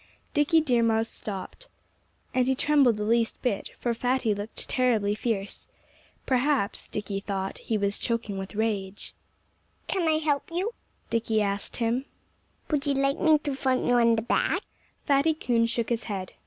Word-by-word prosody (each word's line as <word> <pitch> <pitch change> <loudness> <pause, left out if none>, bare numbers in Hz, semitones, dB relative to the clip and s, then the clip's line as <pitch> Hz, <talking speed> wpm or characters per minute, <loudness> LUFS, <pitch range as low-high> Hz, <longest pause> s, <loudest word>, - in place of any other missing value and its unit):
Dickie 300 +2 +4
Deer 250 -6 +2
Mouse 225 0 +2
stopped. 210 - -6 0.7
And 255 0 +2
he 265 - +3
trembled 275 -5 +4
the 210 - -2
least 230 +1 +1
bit; 235 -6 -1
for 240 - -1
Fatty 245 -1 +1
looked 205 +2 -4
terribly 225 -5 +2
fierce. 210 -2 -3 0.6
Perhaps 255 -4 +1
(Dickie 205 -1 -3
thought) 195 -1 -4
he 220 - -1
was 200 0 0
choking 230 -4 -1
with 195 +2 -7
rage. 205 -3 -2 0.7
"Can 365 -4 0
I 315 -1 +4
help 300 -2 0
you?" 380 +7 -1 0.4
Dickie 225 -2 +1
asked 200 0 -1
him. 240 +3 0 0.7
"Would 295 -1 +1
you 280 - +2
like 275 +1 +1
me 315 -2 +5
to 290 -1 -3
thump 265 -1 0
you 245 - +3
on 235 -1 +5
the 220 - -1
back?" - - +1 0.4
Fatty 290 +2 +3
Coon 235 -6 +1
shook 230 0 -1
his 235 -2 -1
head. 190 -4 -4
235 Hz, 165 wpm, -27 LUFS, 210-275 Hz, 0.7 s, me